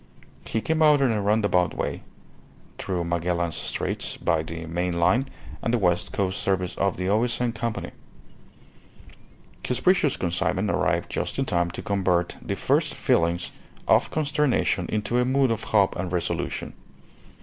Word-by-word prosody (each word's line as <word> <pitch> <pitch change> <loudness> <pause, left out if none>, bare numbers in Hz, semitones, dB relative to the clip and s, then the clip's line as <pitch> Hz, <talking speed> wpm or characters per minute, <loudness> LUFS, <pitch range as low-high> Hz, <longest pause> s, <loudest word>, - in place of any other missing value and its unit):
He 110 - -1
came 160 +5 0
out 150 -2 +6
in 135 -3 +3
a 105 -2 0
roundabout 100 -3 +2
way, - - -3 0.8
through 90 -3 -2
Magellan's 85 0 -1
Straits - - -3
by 80 -3 +1
the 80 +1 -6
main 85 +1 -2
line 125 +10 +2 0.3
and 115 - -1
the 120 - +3
West 90 -5 +1
Coast 95 -1 -1
Service 90 -2 0
of 100 -2 0
the 90 +1 -2
O.S.N. 120 +3 +1
Company. 115 -1 -4 1.7
His 125 -1 -1
precious 180 -4 +3
consignment 85 -1 0
arrived - - 0
just - - -2
in - - 0
time 85 -1 +1
to - - -7
convert 90 -3 0
the - - -3
first - - +1
feelings 85 +1 +1 0.4
of - - +4
consternation 150 -3 +1
into 110 +3 0
a - - +3
mood 130 0 +2
of 110 -1 -2
hope 100 -3 +3
and 90 0 -3
resolution. 90 -2 -2
100 Hz, 150 wpm, -25 LUFS, 85-120 Hz, 1.7 s, out